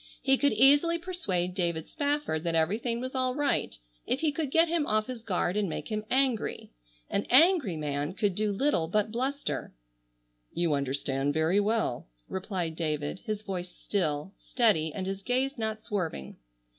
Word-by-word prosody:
He 270 0 +3
could 285 -1 +2
easily 290 +9 +5
persuade 205 - -2
David 170 -4 -1
Spafford 290 - -1
that 165 -1 0
everything 215 +9 +1
was 255 +1 -5
all 255 -1 0
right 290 -1 0 0.3
if 265 - 0
he 315 -2 +2
could 295 -1 -2
get 325 +4 +4
him 330 -3 0
off 215 0 +2
his 250 -1 -6
guard 185 -4 -1
and 205 -3 0
make - - -5
him 215 -1 -3
angry. 260 -4 0 0.4
An 200 - -2
angry 285 - +5
man 145 +1 -2
could 205 -2 +1
do 210 +2 0
little 200 - +1
but 210 +4 0
bluster. 265 +5 -3 0.8
"You 170 -3 0
understand 140 0 -1
very 160 +5 +3
well," 210 - 0 0.2
replied 185 -4 -3
David, 155 0 -2
his 215 -1 -3
voice 185 -3 -4
still, 175 -2 -2
steady 200 -11 +2
and 185 +4 -4
his 195 +1 -4
gaze 260 +5 0
not 220 -1 -3
swerving. 175 - -4
210 Hz, 165 wpm, -29 LUFS, 170-260 Hz, 0.8 s, easily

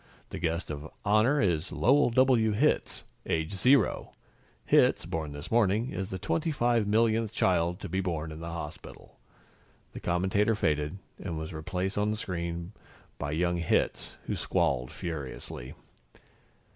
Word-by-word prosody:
The - - -5
guest 85 0 -1
of 75 +1 -6 0.2
honor 110 +8 +4
is 90 - +1
Lowell 140 +1 +4
W. 120 -3 +4
Hitz, 140 +9 +1 0.2
age 80 +4 -1
zero. 130 +8 +3 0.5
Hitz, - - +4
born 80 -3 -3
this 75 0 -8
morning, 115 +1 +2
is 95 -1 -4
the 95 - -4
twenty 160 - -1
five 120 -6 +2
millionth 110 0 +2
child 90 -3 +1
to - - -4
be 95 +3 -1
born 80 -4 -3
in 80 - -8
the 85 +1 -6
hospital." 80 -3 -8 0.7
The - - -6
commentator 95 +5 +1
faded, 75 -3 0 0.3
and 85 -5 -3
was 80 +2 -5
replaced 90 +5 -2
on 105 +1 +2
the 110 - -1
screen 85 -3 -4 0.5
by 75 - -3
young 85 +2 +1
Hitz, 85 -1 0
who - - -2
squalled 65 -2 0
furiously. 70 -5 -6
90 Hz, 145 wpm, -29 LUFS, 80-110 Hz, 0.7 s, honor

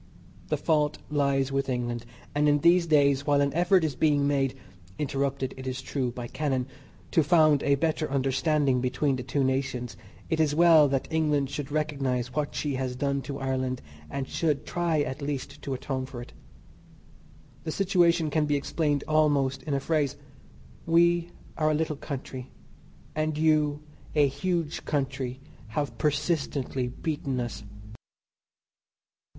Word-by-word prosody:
The - - 0
fault 150 -2 +1
lies 140 -2 +1
with 135 0 -1
England, 120 -2 -2 0.3
and 150 +1 +3
in 145 - +4
these 170 +1 +5
days 140 -3 +3
while 145 -1 +4
an 140 -1 +1
effort 175 +2 +4
is 155 -3 0
being 145 0 +3
made 135 -2 +1 0.4
(interrupted, 140 -2 -1
it 130 0 -7
is 130 0 -3
true, 130 -2 -2
by 120 0 -6
cannon) 130 0 -1 0.5
to 165 - +4
found 155 -2 +4
a 140 - +3
better 155 +1 0
understanding 135 0 +1
between 130 +2 +1
the 130 - -4
two 135 +2 -1
nations 130 -2 -1 0.3
it 160 - -1
is 150 -2 +2
well 165 -3 +7
that 135 -1 -1
England 150 -4 +1
should 145 -2 -4
recognize 135 -5 -1
what 150 +1 -2
she 145 -2 -1
has 130 -1 -2
done 140 +1 0
to 140 0 -5
Ireland, 130 -1 -1 0.3
and 135 -1 -3
should 150 -4 -1
try 170 -3 0
at 130 +1 -3
least 140 -2 -4
to 135 - -3
atone 130 0 -3
for 130 -2 -8
it. 120 - -10 1.3
The 160 - -3
situation 175 -4 +2
can 150 0 +1
be 145 - +2
explained 145 0 0
almost 145 -3 +2
in 140 +1 -2
a - - +1
phrase. 150 -1 0 0.7
We 170 +1 +4 0.3
are 155 -1 +2
a 155 - +2
little 155 0 -1
country 130 -2 -6 0.6
and 155 0 -1
you, 150 -1 +2 0.3
a 150 -1 +5
huge 165 +3 -2
country, 135 -3 -2 0.4
have 140 -6 -2
persistently 145 -4 0
beaten 135 0 -3
us. 120 -3 -4
145 Hz, 155 wpm, -27 LUFS, 135-155 Hz, 1.3 s, well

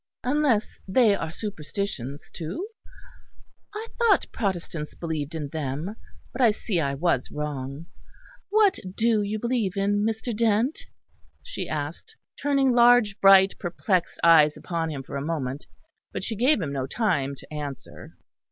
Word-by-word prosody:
Unless 255 -5 +1
they 215 +2 +4
are 160 -4 -4
superstitions, 160 - -5
too? 180 - -5 1.1
I 435 +2 -4
thought 460 -5 +4
Protestants 175 -7 -3
believed 160 -2 -4
in 150 -3 -4
them; 155 +6 -4 0.4
but 250 - -3
I 240 - +7
see 210 -3 -1
I 140 -3 0
was 140 -4 0
wrong. 145 0 -5 0.6
What 420 -2 +4 0.2
do 225 -1 +2
you 205 +1 -2
believe 225 -4 -1
in, 205 +1 +1
Mr. 220 +1 -2
Dent?" 230 +5 +1 0.6
she - - -5
asked, 155 - -5 0.3
turning 275 -2 +3
large, 240 -3 +5
bright, 195 0 +7
perplexed 180 0 -1
eyes 155 -3 +6
upon 165 -2 -3
him 140 -3 -5
for 140 - -6
a - - -3
moment: 145 -3 -3 0.4
but - - -5
she 220 - -3
gave 250 +5 +3
him 140 -3 -3
no 135 -1 -2
time 145 - 0
to 145 - -12
answer. 140 -4 -7
190 Hz, 145 wpm, -25 LUFS, 150-230 Hz, 1.1 s, I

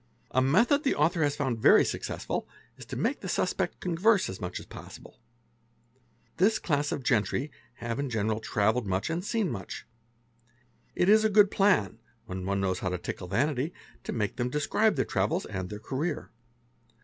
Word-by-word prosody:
A 130 - +3
method 220 - +4
the 275 - +2
author 160 +3 +2
has 145 -1 +2
found 130 -6 -1
very - - +6
successful - - -3 0.3
is - - -11
to - - -6
make - - 0
the - - -5
suspect - - -1
converse 185 +4 +2
as 95 - -9
much 90 0 -4
a - - -6
as - - -12
possible. - - -12 0.6
' 120 0 -38
This 215 +4 +4
class 145 -3 0
of 135 - -3
gentry 125 +5 +1 0.2
have 115 0 -4
in 140 -1 -2
general 110 -1 0
travelled 110 +1 +1
much 95 - -1
and 170 +2 -2
seen 215 -3 0
much 95 -5 -6 1.1
It 175 - +2
is 215 +2 +6
a 220 - +3
good 205 -1 +5
plan, 195 - +2 0.3
when 90 0 -5
one 100 0 0
knows 95 -2 0
how 95 - -2
to 90 - -2
tickle 90 +1 -6
vanity, 140 - 0 0.3
to - - -4
make 105 -3 -2
ther 120 - 0
describe 155 - +2
their 130 - +1
travels 95 +2 0
and 95 -3 -5
their 105 - -6
career. 135 +10 -3
130 Hz, 185 wpm, -28 LUFS, 105-175 Hz, 1.1 s, very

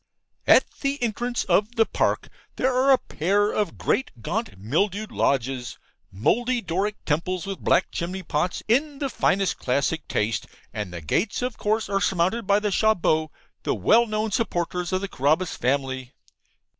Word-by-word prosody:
At - - +7 0.2
the 280 0 -1
entrance 240 +2 -1
of 205 +6 +1
the 225 - +4
park, - - 0 0.3
there 260 0 +1
are 260 +2 +3
a 265 - +7
pair 205 +2 0
of 205 -6 -1
great 265 +3 0
gaunt 225 - -3
mildewed 195 - -1
lodges 130 -2 -1 0.3
mouldy 240 - +1
Doric 195 +2 -1
temples 170 +4 -1
with 195 -1 -5
black 180 - +2
chimney 185 +2 -4
pots, 165 +3 -1
in 280 +6 +2
the 275 -1 -2
finest 195 0 +1
classic 140 +5 0
taste, 105 0 -1 0.3
and 105 -4 -4
the 85 -1 -6
gates 190 - 0
of 250 -2 -3
course 215 +1 0
are 195 -1 0
surmounted 190 +4 +1
by 200 0 +4
the 210 -1 -1
CHATS 220 +1 +3
BOTTES, 155 -1 +1 0.3
the - - -1
well 235 +1 +4
known 215 0 -1
supporters 180 -5 -1
of 185 0 0
the 200 - -2
Carabas 155 +3 +1
family. 130 -1 -1
195 Hz, 165 wpm, -24 LUFS, 155-220 Hz, 0.3 s, At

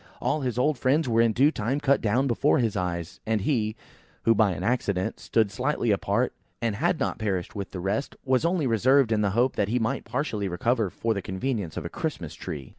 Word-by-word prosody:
All 155 - 0
his 125 -3 -2
old 135 +1 +1
friends 140 +3 +2
were 115 -1 +3
in 115 -1 +4
due 135 +7 +4
time 130 +2 -1
cut 140 -1 +2
down 115 +5 +2
before 135 +4 +2
his 115 -6 0
eyes; 85 -3 -3
and 110 -2 +1
he, 110 -3 0 0.5
who 115 - +5
by 110 -1 +3
an 90 - -5
accident 100 -5 -1
stood 110 -3 +1
slightly 125 +1 0
apart, 100 - +1 0.3
and 115 -2 -1
had - - +1
not - - -1
perished 95 -5 -2
with 100 -3 -5
the 95 - -6
rest, 100 +9 -2
was 130 0 +2
only 170 -2 +1
reserved 130 +2 +3
in 110 -1 +2
the 100 - +2
hope 125 +2 +3
that 100 - +1
he 120 - +1
might 115 -2 -1
partially 115 -7 -2
recover 110 +4 0
for 115 +5 -1
the 100 - -3
convenience 95 - -3
of - - -4
a - - -3
Christmas 90 - -4
tree. 75 -5 -7
115 Hz, 220 wpm, -26 LUFS, 100-130 Hz, 0.5 s, who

